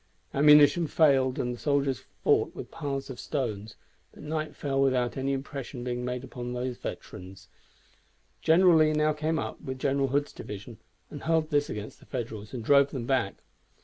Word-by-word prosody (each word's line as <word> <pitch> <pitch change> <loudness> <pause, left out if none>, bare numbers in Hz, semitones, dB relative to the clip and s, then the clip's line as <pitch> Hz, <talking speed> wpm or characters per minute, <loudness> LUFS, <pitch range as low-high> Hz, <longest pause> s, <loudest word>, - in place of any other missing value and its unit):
Ammunition 150 +3 +6
failed, 135 -5 +3
and 125 0 -1
the 120 - -9
soldiers 140 -4 +1 0.2
fought - - +2
with - - -8
piles 140 -4 -4
of 125 - -9
stones, 110 -7 -3 0.4
but - - -14
night 155 0 -3
fell 135 -1 -1
without 130 -3 +1
any 135 +1 -1
impression 135 -2 -5
being 125 0 -3
made 125 0 -3
upon 125 -2 -6
these 125 0 -3
veterans. 95 +1 -8 0.9
General 170 +1 +5
Lee 155 -1 +4
now 150 0 +2
came 155 +2 -1
up - - -4
with 130 0 -5
General 135 +1 +1
Hood's 145 +2 -1
division, 105 +1 -9 0.3
and - - -7
hurled 160 -1 +1
this 145 0 +2
against 105 0 -6
the - - -19
Federals 110 -5 -5
and 125 -4 -5
drove 140 +1 +5
them 130 -4 -5
back. 125 -7 -1
135 Hz, 175 wpm, -28 LUFS, 125-150 Hz, 0.9 s, Ammunition